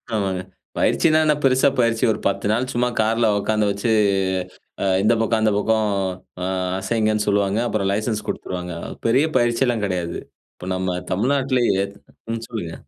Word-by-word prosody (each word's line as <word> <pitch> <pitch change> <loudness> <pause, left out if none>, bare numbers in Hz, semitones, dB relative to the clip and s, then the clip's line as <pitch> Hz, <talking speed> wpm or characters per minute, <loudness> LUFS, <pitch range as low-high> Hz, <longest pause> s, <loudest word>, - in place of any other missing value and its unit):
ஆமாங்க. 95 -3 -1 0.4
பயிற்சினா 155 -1 +3
என்ன 150 -1 +3
பெருசா 130 +1 +4
பயிற்சி, 115 -1 +2
ஒரு - - -6
10 100 - -1
நாள் 125 +3 0
சும்மா 125 +1 +1
கார்ல 115 +1 +2
உட்காந்து 105 0 +1
வச்சு, 100 +3 -1 0.9
ஆ - - +1 0.2
இந்த 110 +3 +4
பக்கம் 115 0 +1
அந்த 110 - +3
பக்கம் 110 +1 +1 0.6
ஆ - - -1 0.3
அசைங்கன்னு 110 +1 0
சொல்லுவாங்க. 100 0 +1
அப்புறம் 100 -2 0
லைசென்ஸ் 110 +1 -2
குடுத்துருவாங்க. 90 -1 -4 0.3
பெரிய 135 +7 +4
பயிற்சில்லாம் 120 -2 +1
கெடையாது. 90 -3 -3 0.4
இப்ப 90 - -9
நம்ம 90 -1 -2
தமிழ்நாட்டிலேயே 125 -2 +1 0.5
ம், 115 0 -4
சொல்லுங்க. 95 -9 -5
110 Hz, 145 wpm, -21 LUFS, 100-120 Hz, 0.9 s, பெருசா